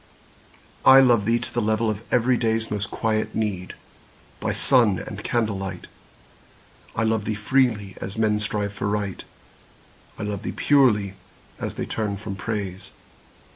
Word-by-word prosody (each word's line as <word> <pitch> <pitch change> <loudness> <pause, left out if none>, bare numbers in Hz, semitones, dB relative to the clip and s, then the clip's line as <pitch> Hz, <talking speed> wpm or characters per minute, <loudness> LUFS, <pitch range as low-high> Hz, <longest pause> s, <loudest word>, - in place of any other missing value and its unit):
I 135 - +9
love 120 -6 +4
thee 115 +2 +3
to - - -7
the 120 - 0
level 110 +1 +1
of 105 0 -5
everyday's 115 -2 +1
Most 105 -1 -2
quiet 110 -1 -1
need, 100 -4 -2 0.6
by - - -1
sun 115 -8 +3
and - - -7
candlelight. 95 -6 -2 1.1
I 115 - +1
love 110 -1 +1
thee 110 - -1
freely, 110 -3 +1
as 100 +3 -5
men 105 -1 +2
strive 105 -1 -2
for 100 0 -3
Right; 100 -3 -2 0.9
I - - -5
love 105 -2 -3
thee - - -4
purely, 115 -9 +3 0.5
as - - -4
they - - -3
turn 105 -3 -2
from 100 -1 -6
Praise. 95 -2 -4
105 Hz, 145 wpm, -24 LUFS, 100-115 Hz, 1.1 s, I